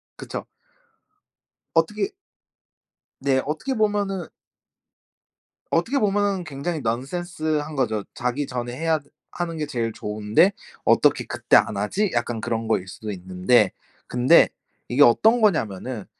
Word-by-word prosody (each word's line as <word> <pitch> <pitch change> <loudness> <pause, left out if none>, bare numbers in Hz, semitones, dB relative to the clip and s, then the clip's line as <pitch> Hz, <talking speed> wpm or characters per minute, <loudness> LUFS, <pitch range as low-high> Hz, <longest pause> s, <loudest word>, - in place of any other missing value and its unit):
그쵸. - - -6 1.3
어떻게 210 - +1 1.1
네. 135 -1 +2
어떻게 160 - -2
보면은 205 -5 0 1.4
어떻게 200 +12 +1
보면은 200 -3 +1
굉장히 155 +2 -4
넌센스한 155 +5 -2
거죠. 110 -6 0
'자기 125 +4 -2
전에 120 -1 -4
해야 160 0 +1 0.3
하는 170 -2 -4
게 150 - -2
제일 120 -5 -2
좋은데 105 - +2 0.3
어떻게 - - +3
그때 - - +1
안 - - +1
하지?' 185 - 0
약간 120 -1 -1
그런 115 0 -2
거일 95 -4 0
수도 110 +2 -7
있는데. 95 +3 +2 0.4
근데 125 +7 +5 0.4
이게 145 - +3
어떤 220 - +5
거냐 205 -7 +4
하면은 105 +1 -6
140 Hz, 265 characters per minute, -23 LUFS, 115-175 Hz, 1.4 s, 근데